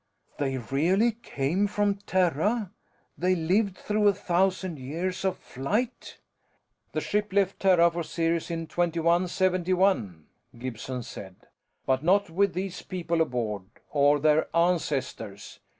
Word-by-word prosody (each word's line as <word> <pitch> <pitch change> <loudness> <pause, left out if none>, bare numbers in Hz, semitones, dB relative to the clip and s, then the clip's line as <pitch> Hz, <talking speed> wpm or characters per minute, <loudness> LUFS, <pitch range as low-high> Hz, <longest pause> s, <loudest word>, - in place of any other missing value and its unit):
"They 135 -2 0
really 165 - +2
came 190 -4 -1
from 205 -1 0
Terra? 190 - +1 0.5
They 185 +1 +2
lived 185 +4 +1
through 210 0 +1
a 200 - +4
thousand 185 -2 0
years 175 +8 -3
of 190 -1 0
flight?" 210 - -3 0.8
"The - - -1
ship 210 0 -1
left 195 0 +1
Terra 175 -3 +5
for 170 +1 -3
Sirius 165 +1 -1
in 165 -1 -3
2171," 175 - +1 0.3
Gibson 125 +1 -5
said. 95 -4 -9 0.5
"But 130 +1 +1
not 190 +1 +3
with 195 +1 +1
these 185 0 -4
people 170 -3 -2
aboard, 115 - -2 0.3
or 145 0 +4
their 155 +1 +3
ancestors. 140 - -1
170 Hz, 120 wpm, -27 LUFS, 145-190 Hz, 0.8 s, Terra